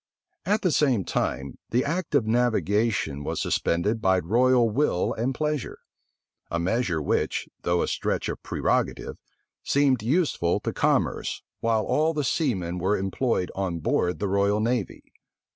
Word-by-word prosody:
At 210 +2 +1
the 180 - +3
same 130 -10 +2
time, 65 +2 -2
the 125 +4 +1
act 165 +1 -2
of 130 -6 +3
navigation 110 - +1
was - - -3
suspended 105 +7 0
by 95 -2 +3
royal 120 +7 +3
will 110 -5 +1
and 120 +4 -1
pleasure; 150 -3 -2 0.7
a 85 - -1
measure 95 0 0
which, 75 - -1
though 85 0 +1
a - - -2
stretch - - -1
of - - -5
prerogative, - - -1 0.4
seemed 135 -4 +2
useful 125 - +1
to - - -3
commerce, - - 0 0.2
while 115 -1 +1
all 155 +6 +1
the 150 - 0
seamen 95 - -1
were 95 +4 +1
employed 95 +1 -1
on 95 -3 -2
board 90 +2 0
the 100 - -2
royal 100 +2 +2
navy. 115 -2 -1
110 Hz, 145 wpm, -25 LUFS, 90-130 Hz, 0.7 s, the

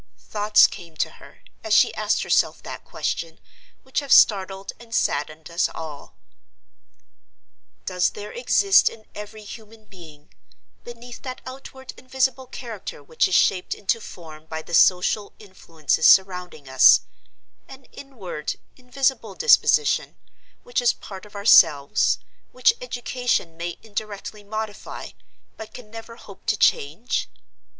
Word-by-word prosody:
Thoughts 210 0 +3
came 165 -3 -6
to - - 0
her, - - -17 0.2
as - - +2
she - - +4
asked - - 0
herself - - +1
that - - -8
question, 165 -1 -4 0.4
which 260 - -2
have 280 -3 -7
startled 195 -1 +4
and 230 -1 -8
saddened 155 +3 -2
us 170 - +1
all. 155 -3 -9 1.7
Does 180 -1 +1
there 210 0 -9
exist 400 -5 +4
in 220 -1 -15
every 210 +1 -9
human 220 +1 -12
being, 160 -7 -16 0.5
beneath 240 0 -11
that 255 -2 -7
outward 265 0 -10
and 255 - -21
visible 265 0 0
character 225 - -8
which 155 +3 +1
is 185 - 0
shaped 180 +1 +2
into 215 +3 -1
form 160 -5 -12
by 160 0 -6
the - - -11
social 185 +4 +3
influences 165 -7 -1
surrounding 180 -6 +3
us, 130 0 +6 0.7
an 270 0 -13
inward, 200 - -7 0.2
invisible 260 +1 -2
disposition, 460 -1 +3 0.5
which 245 0 -1
is 245 - +3
part 195 0 -11
of 210 - -19
ourselves, 150 -8 +4 0.3
which 455 - +3
education 245 - -2
may 170 +1 -5
indirectly 210 -1 -7
modify, 215 0 -6 0.5
but 220 - -10
can 225 -4 -12
never 225 +1 -10
hope - - -15
to - - +1
change? 455 -3 0
210 Hz, 130 wpm, -23 LUFS, 170-245 Hz, 1.7 s, us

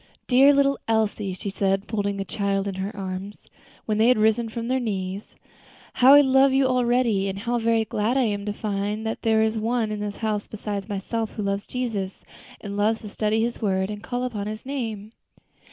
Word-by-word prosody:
"Dear 270 +3 +6
little 275 -1 +2
Elsie," 215 -3 0
she 195 +2 -5
said, 195 0 0
folding 200 -2 -2
the 195 - -3
child 200 0 -1
in 195 - -2
her 190 +2 -5
arms, 190 +1 -5 0.5
when 215 -1 -1
they 225 - +5
had 250 - +5
risen 220 +2 +2
from 230 +1 -5
their 260 +1 +1
knees, 195 -4 -4 0.6
"how 260 +3 +7
I 290 - +9
love 265 0 +4
you 270 0 +3
already, 240 -5 +2
and 195 - -4
how 235 +4 -1
very 225 -1 +2
glad 220 +5 0
I 265 - +3
am 205 -3 -1
to - - 0
find 210 +1 -3
that 220 - -3
there 220 -1 +3
is 220 0 0
one 225 0 0
in 210 - -3
this 205 -1 -4
house 215 -2 -2
beside 205 -1 -5
myself 215 +3 -3
who 210 - -4
loves 200 0 -2
Jesus, 220 -7 -4 0.4
and 200 -1 -6
loves 215 +2 +1
to 215 - -8
study 215 +1 0
His 235 +1 -3
word, 190 -1 0
and 205 -1 -6
to - - -14
call 245 0 -1
upon 215 -5 -3
His 215 +2 -6
name." 225 -6 -4
215 Hz, 210 wpm, -24 LUFS, 200-235 Hz, 0.6 s, I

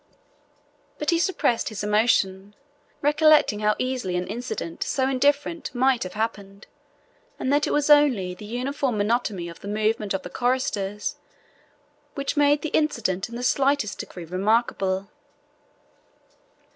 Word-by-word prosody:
But 300 - 0
he 335 - +2
suppressed 335 - +1
his 215 -2 -5
emotion, 205 -2 +1 0.5
recollecting 300 -6 +4
how 210 0 +2
easily 255 -8 -2
an 180 0 -1
incident 230 -8 -5
so 265 -2 0
indifferent 285 +3 0
might 260 0 +2
have 185 - -4
happened, 205 -2 -4 0.7
and 265 - -1
that 295 +1 +2
it - - -1
was 295 -1 +1
only 275 -12 +4
the 195 +4 -11
uniform 250 +2 -2
monotony 205 -4 0
of 170 - -10
the - - -10
movement 210 -1 0
of 190 - -4
the 180 - -7
choristers 210 -5 -1 1.0
which 280 +2 -2
made 290 0 +3
the 315 - -2
incident 235 -12 0
in 235 - -8
the 245 - -5
slightest 275 -3 +1
degree 175 -2 -7
remarkable. 195 +1 0
230 Hz, 135 wpm, -24 LUFS, 200-280 Hz, 1.0 s, recollecting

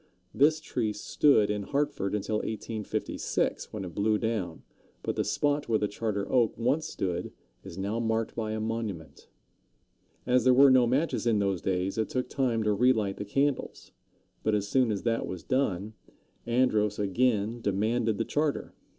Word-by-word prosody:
This 155 +3 +4
tree 120 -8 -2
stood 105 +1 +3
in 105 -1 -2
Hartford 105 -5 -1
until 105 +1 -1
1856, 110 0 -3
when 105 -3 -5
it 85 - -8
blew 105 +3 +2
down; 105 -7 -3 0.4
but - - -2
the - - 0
spot 145 -1 0
where 110 - +3
the 105 - 0
Charter 105 -1 -3
Oak 120 -4 +2
once 135 +8 0
stood 90 -2 -3 0.3
is 95 -3 -10
now 100 +4 -2
marked 115 -1 -1
by 110 -2 -3
a 110 - -2
monument. 110 -7 -5 1.0
As 125 -1 +3
there 130 0 +5
were 135 +1 +7
no 130 -2 +5
matches 130 0 0
in 115 -2 +3
those 100 -3 0
days, 95 +2 -1
it 110 - 0
took 125 -1 -2
time 120 -5 0
to 105 -1 +2
relight 110 -3 +2
the 105 - -5
candles; 140 +6 -1 0.5
but 110 -1 +1
as 100 -1 -1
soon 125 +1 +2
as 100 - -3
that 115 -1 0
was 90 -3 -6
done, 110 -6 -1 0.5
Andros 110 -4 +2
again 110 +2 0
demanded 110 +2 0
the - - -1
charter. 150 -1 -1
110 Hz, 170 wpm, -28 LUFS, 100-125 Hz, 1.0 s, were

